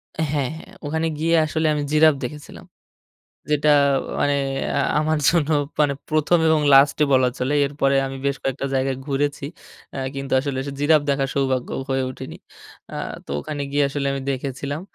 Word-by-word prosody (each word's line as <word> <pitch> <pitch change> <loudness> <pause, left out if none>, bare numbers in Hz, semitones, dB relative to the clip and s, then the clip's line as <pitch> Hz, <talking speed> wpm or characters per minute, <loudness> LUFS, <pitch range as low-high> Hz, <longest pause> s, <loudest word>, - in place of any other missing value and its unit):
হ্যাঁ, 160 -1 -1 0.3
হ্যাঁ। 190 +4 -13
ওখানে 160 +2 -1
গিয়ে 165 +2 +2
আসলে 155 +1 -1
আমি 145 -1 -1
জিরাফ 155 -1 +5
দেখেছিলাম। 150 +4 -8 0.9
যেটা 150 0 +2 0.5
মানে 145 0 +2 0.4
আ - - +2 0.2
আমার 155 0 +1
জন্য 160 -3 +1 0.3
মানে 145 -2 +3 0.2
১ম 155 +3 +2
এবং 160 -1 +3
লাস্টে 140 +2 +5
বলা 130 -1 +4
চলে। 130 +3 0
এরপরে 140 -1 0
আমি 135 0 -7
বেশ 140 0 +1
কয়েকটা 135 +1 -2
জায়গায় 130 0 0
ঘুরেছি। 145 0 -1 0.5
এ্যা 135 - -5 0.2
কিন্তু 135 0 -5
আসলে 135 -1 -3
সে - - -4
জিরাফ 150 +1 +4
দেখার 135 -1 0
সৌভাগ্য 130 -2 0 0.2
হয়ে 135 0 0
ওঠেনি। - - -9 0.6
আ - - -7 0.3
তো - - -20
ওখানে 145 - -5
গিয়ে 145 0 +2
আসলে 140 0 -3
আমি 135 - -3
দেখেছিলাম। 140 +3 -4
145 Hz, 165 wpm, -22 LUFS, 135-155 Hz, 0.9 s, জিরাফ